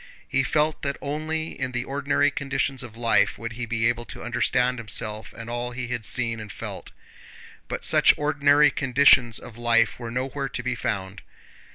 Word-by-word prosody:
He 135 - +1
felt 150 +3 0
that 140 -1 -2
only 155 +2 -3
in 130 -1 -4
the 125 0 -1
ordinary 145 +1 +1
conditions 135 -1 -2
of 115 -2 -10
life 115 -1 +2
would 115 0 -6
he 120 0 -5
be 115 0 +1
able 120 0 -1
to - - -8
understand 125 +1 +1
himself 110 -1 -3
and 115 - -9
all 120 +1 -3
he 125 -1 -5
had 120 -3 -3
seen 115 -1 +2
and 105 -1 -8
felt. - - -7 0.8
But - - -5
such - - +6
ordinary 145 0 +4
conditions 130 -4 +4
of 115 -1 -10
life 115 -1 +2
were 120 -2 -5
nowhere 135 +3 -3
to 125 - -4
be 120 - -1
found. 100 -4 -4
125 Hz, 180 wpm, -25 LUFS, 115-140 Hz, 0.8 s, such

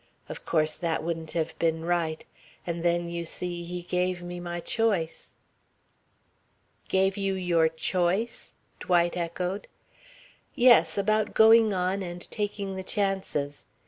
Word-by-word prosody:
Of - - -8
course 155 -1 +2
that 165 -1 -2
wouldn't 165 -1 -4
have 165 -2 -1
been 165 -1 0
right. 170 -2 -1 0.4
And 170 -1 -3
then, 175 0 +1
you 170 0 -4
see, 175 +1 -4
he 175 +1 -5
gave 180 0 -1
me 175 0 -6
my 175 0 -4
choice." 195 -4 -1 1.5
"Gave 190 +1 +2
you 195 -1 0
your 170 -3 +2
choice?" 180 +7 -1 0.2
Dwight 175 -1 +2
echoed. 180 +3 -3 0.9
"Yes. 245 -3 +5
About 215 +1 +1
going 220 0 +7
on 185 +1 0
and 175 -1 -6
taking 205 -2 -3
the 190 - -5
chances. 190 -8 -2
175 Hz, 130 wpm, -27 LUFS, 170-195 Hz, 1.5 s, going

